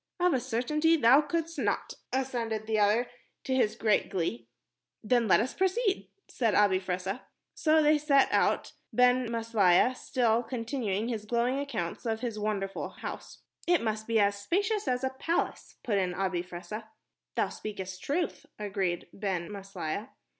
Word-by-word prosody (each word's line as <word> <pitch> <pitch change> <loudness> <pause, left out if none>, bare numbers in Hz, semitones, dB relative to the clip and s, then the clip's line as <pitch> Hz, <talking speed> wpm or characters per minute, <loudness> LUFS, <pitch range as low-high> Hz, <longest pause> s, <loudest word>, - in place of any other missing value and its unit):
"Of 360 0 +3
a 260 - +2
certainty 300 +7 +1
thou 260 +2 +6
couldst 330 +2 -3
not," - - -1 0.2
assented 235 -5 -2
the 215 -1 0
other, 210 +4 +3 0.4
to 260 - -1
his 230 -5 +2
great 215 -2 +2
glee. 120 - -2 0.6
"Then 235 0 +2
let - - +6
us 240 +5 -1
proceed," 385 +2 0 0.2
said 230 -4 0
Abi 200 -3 +4
Fressah. 185 +4 -3 0.3
So 310 0 +3
they 300 0 +4
set 280 -2 +4
out, - - +2 0.2
Ben 250 -1 +3
Maslia 230 -1 +3
still 235 -3 +1
continuing 230 -4 -2
his 220 -3 -3
glowing 245 +4 +1
account 280 -12 -4
of 225 0 -1
his 230 -4 -3
wonderful 200 -2 -2
house. - - -8 0.2
"It 350 -7 +3
must 220 -1 -2
be 230 -1 +2
as 200 0 +2
spacious 405 - 0
as 250 0 0
a 265 - 0
palace," 325 +6 -2
put 205 -4 +1
in 180 -2 -1
Abi 185 -2 0
Fressah. 185 +5 -7 0.5
"Thou - - +1
speakest 190 -3 -6
truth," 330 +4 -2
agreed 195 -4 -2
Ben 190 -3 -3
Maslia. 195 -5 -5
230 Hz, 155 wpm, -29 LUFS, 200-265 Hz, 0.6 s, thou